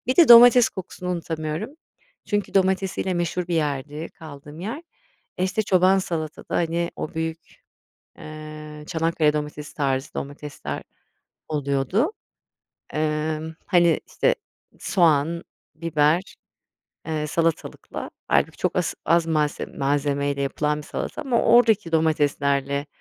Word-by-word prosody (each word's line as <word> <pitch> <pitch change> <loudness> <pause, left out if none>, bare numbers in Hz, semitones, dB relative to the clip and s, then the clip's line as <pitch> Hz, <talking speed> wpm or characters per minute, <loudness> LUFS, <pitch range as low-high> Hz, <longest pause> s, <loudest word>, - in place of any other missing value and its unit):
Bir 255 - 0
de 340 -6 +7
domates 240 0 +9
kokusunu 180 -1 -6
unutamıyorum 165 +3 -3 0.6
çünkü 205 -1 -1
domatesiyle 190 -1 +1
meşhur 175 +1 -1
bir 175 - 0
yerdi 150 0 -2
kaldığım 150 0 -11
yer. 225 - -5 0.6
Eee, - - +2
işte, 190 +4 0
çoban 190 -1 +4
salatada, 160 -5 -4
hani, 170 0 0
o - - -5
büyük, 160 0 -3 0.8
eee, 155 0 -9
Çanakkale 160 -2 +1
domatesi 150 0 -5
tarzı 135 -2 -1
domatesler 145 +1 -6 0.7
oluyordu. 150 - 0 0.8
Emm, 155 +1 -1
hani, 170 -3 +4
işte, - - +1 0.5
soğan, 165 -1 +2 0.3
biber, 160 +2 +1 0.7
eee, 155 -1 -2
salatalıkla, 165 +1 -2 0.2
hâlbuki, - - +2
çok - - -1
as - - 0
az 170 +1 +3
malse 155 -2 0
malzemeyle 140 0 -1
yapılan 150 +2 -1
bir - - -7
salata - - -4
ama 255 -5 +1
oradaki 225 -6 +4
domateslerle 140 -3 +1
160 Hz, 115 wpm, -24 LUFS, 150-180 Hz, 0.8 s, domates